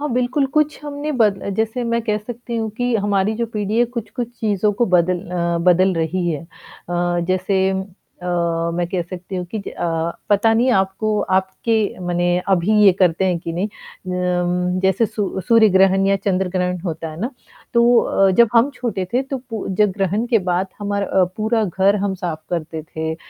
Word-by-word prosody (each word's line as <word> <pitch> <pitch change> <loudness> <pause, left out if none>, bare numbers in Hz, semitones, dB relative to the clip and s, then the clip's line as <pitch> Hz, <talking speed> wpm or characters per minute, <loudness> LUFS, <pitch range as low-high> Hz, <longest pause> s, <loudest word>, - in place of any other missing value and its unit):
हाँ, 295 - -2
बिल्कुल, 250 +3 +1
कुछ 300 +2 0
हमने 290 +1 -4
बद 200 -3 +2
जैसे 225 +3 -1
मैं 235 0 0
कह 215 -2 0
सकती 235 +2 -6
हूँ 225 -1 -1
कि 245 -1 0
हमारी 200 0 +1
जो 235 0 -1
पीढ़ी 215 0 -2
है 240 - +5
कुछ-कुछ 235 +2 -4
चीज़ों 210 -2 +1
को 235 +4 +1
बदल 180 0 +2
अ, 170 -1 0
बदल 185 +1 +4
रही 170 +2 -1
है। 155 -1 -3
अ, - - -19 0.8
जैसे 185 +1 +1 0.6
अ, - - -5 0.5
मैं 175 0 -1
कह 180 -1 -1
सकती 180 +2 -7
हूँ 180 - -3
कि - - 0
अ, - - -5 0.5
पता 205 +2 +4
नहीं 245 +3 +3
आपको 195 +2 0 0.2
आपके 190 +4 -1 0.3
माने 175 0 0 0.2
अभी 190 +1 +2
ये 195 - +8
करते 180 0 +3
हैं 180 -2 +1
कि 165 - -5
नहीं। 180 +4 -1
अ, 180 -2 -2
जैसे 190 +4 +3
सूर्य 205 -3 -3
सूर्य 230 -2 +6
ग्रहण 195 0 +4
या 195 - +3
चंद्र-ग्रहण 185 -2 -1
होता 165 -1 -4
है 155 +3 -9
ना, 235 - -2 0.4
तो 235 +1 +5
अ, 195 0 +2
जब 230 +4 +5
हम 235 +5 +5
छोटे 220 -7 -3
थे 250 - +2
तो 270 0 -4
पू 225 -2 -4
जब 210 -2 +5
ग्रहण 200 +4 0
के 235 -2 +3
बाद 180 +2 +1
हमार 200 0 -1
अ, 190 -1 +2
पूरा 220 +1 +1
घर 195 +2 +2
हम 195 - -1
साफ 175 -4 -5
करते 160 -2 -3
थे 160 +1 -4
अ, - - -7
195 Hz, 190 wpm, -20 LUFS, 180-225 Hz, 0.8 s, ये